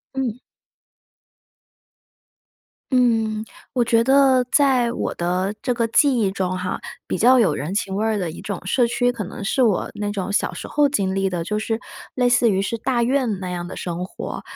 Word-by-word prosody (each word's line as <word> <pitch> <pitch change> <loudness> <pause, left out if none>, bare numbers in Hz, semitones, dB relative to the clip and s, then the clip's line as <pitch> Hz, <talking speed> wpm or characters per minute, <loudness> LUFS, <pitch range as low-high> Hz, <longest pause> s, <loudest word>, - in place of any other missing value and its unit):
嗯。 250 -3 -2 2.5
嗯。 225 -4 +2 0.3
我 245 -2 +2
觉 230 0 +3
得 265 -1 +4
在 260 -5 +3
我 - - -2
的 180 +3 -1
这 250 - 0
个 235 -1 0
记 270 +2 +3
忆 200 -3 +1
中 185 -1 -2
哈， 180 0 -3 0.3
比 - - -2
较 255 +5 +5
有 205 -11 +3
人 150 +6 -4
情 195 -2 -1
味 210 - 0
儿 220 -1 +1
的 180 -4 -2
一 - - -10
种 200 -3 -4
社 240 +5 +2
区， 245 +1 +1
可 235 -3 -5
能 195 - -8
是 230 +7 0
我 220 -7 +2
那 205 0 -3
种 200 -1 -3
小 - - +1
时 - - -7
候 295 -1 +3
经 195 -9 0
历 195 0 0
的， 175 -2 -3
就 210 +5 -2
是 225 +1 -2 0.4
类 250 -1 +2
似 245 -1 +4
于 195 -2 +1
是 215 +4 -2
大 240 0 0
院 245 -5 0
那 185 -1 -5
样 175 0 -4
的 - - -8
生 175 0 -4
活。 - - -7
220 Hz, 210 characters per minute, -22 LUFS, 190-245 Hz, 2.5 s, 较